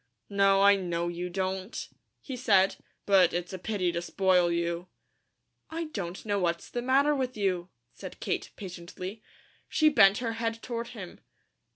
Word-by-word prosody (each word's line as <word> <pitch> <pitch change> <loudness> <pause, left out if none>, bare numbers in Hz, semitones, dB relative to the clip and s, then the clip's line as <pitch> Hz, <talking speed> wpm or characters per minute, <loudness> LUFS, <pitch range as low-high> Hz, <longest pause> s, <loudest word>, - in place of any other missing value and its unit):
"No, 195 0 +4
I 200 0 +7
know 175 -2 -2
you 175 +1 -4
don't," 190 +3 -3 0.3
he 265 - -6
said. 200 -6 +3 0.3
"But 190 -4 +5
it's 175 +1 -3
a 185 - -5
pity 185 -2 -1
to 170 0 -2
spoil 180 -1 +2
you." 170 +1 -1 0.8
"I 325 0 -4
don't 180 -1 -5
know 205 -1 0
what's 170 -2 -1
the 240 - -2
matter 275 +4 +3
with 255 -4 -2
you," 185 -3 0 0.2
said - - -9
Kate, - - -2
patiently. 185 +2 -8 0.5
She 310 -1 +4
bent 195 -9 +6
her 235 -2 -2
head 230 0 -2
toward 235 -1 -4
him. 185 -4 -8
195 Hz, 160 wpm, -29 LUFS, 175-230 Hz, 0.8 s, I